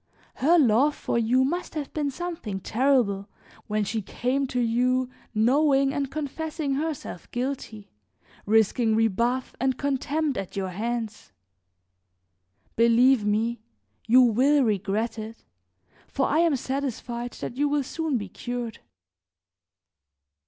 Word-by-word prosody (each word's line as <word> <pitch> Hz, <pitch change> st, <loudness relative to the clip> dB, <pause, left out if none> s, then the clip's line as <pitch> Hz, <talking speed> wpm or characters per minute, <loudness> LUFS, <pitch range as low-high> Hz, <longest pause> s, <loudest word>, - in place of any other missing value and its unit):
Her 330 Hz, +6 st, +4 dB
love 275 Hz, +1 st, +4 dB
for 235 Hz, -, -1 dB
you 245 Hz, +3 st, +3 dB
must 335 Hz, +5 st, -2 dB
have 295 Hz, -3 st, -4 dB
been 295 Hz, -2 st, -1 dB
something 280 Hz, -, -5 dB
terrible 225 Hz, -4 st, +1 dB, 0.4 s
when 215 Hz, 0 st, 0 dB
she 220 Hz, +2 st, -2 dB
came 260 Hz, +7 st, -1 dB
to 250 Hz, -1 st, -2 dB
you 250 Hz, +2 st, +1 dB, 0.2 s
knowing 275 Hz, +4 st, +3 dB
and 280 Hz, -2 st, -2 dB
confessing 310 Hz, 0 st, -3 dB
herself 290 Hz, -, -4 dB
guilty, 245 Hz, -5 st, -5 dB, 0.6 s
risking 220 Hz, +1 st, +3 dB
rebuff 235 Hz, +4 st, 0 dB
and 260 Hz, 0 st, 0 dB
contempt 285 Hz, 0 st, -1 dB
at 195 Hz, -, -7 dB
your 190 Hz, -1 st, -2 dB
hands. 220 Hz, -, -4 dB, 1.4 s
Believe 235 Hz, +1 st, +5 dB
me, 220 Hz, +3 st, 0 dB, 0.5 s
you 250 Hz, +3 st, +7 dB
will 265 Hz, +5 st, +4 dB
regret 215 Hz, +1 st, -1 dB
it, 220 Hz, +1 st, -8 dB, 0.6 s
for 270 Hz, -, 0 dB
I 305 Hz, -, +2 dB
am 335 Hz, -3 st, +3 dB
satisfied 245 Hz, -2 st, -4 dB
that -, -, -6 dB
you 290 Hz, +1 st, +2 dB
will 290 Hz, -1 st, +1 dB
soon 310 Hz, 0 st, -2 dB
be 205 Hz, -3 st, -5 dB
cured." 240 Hz, +2 st, -5 dB
250 Hz, 125 wpm, -26 LUFS, 225-280 Hz, 1.4 s, you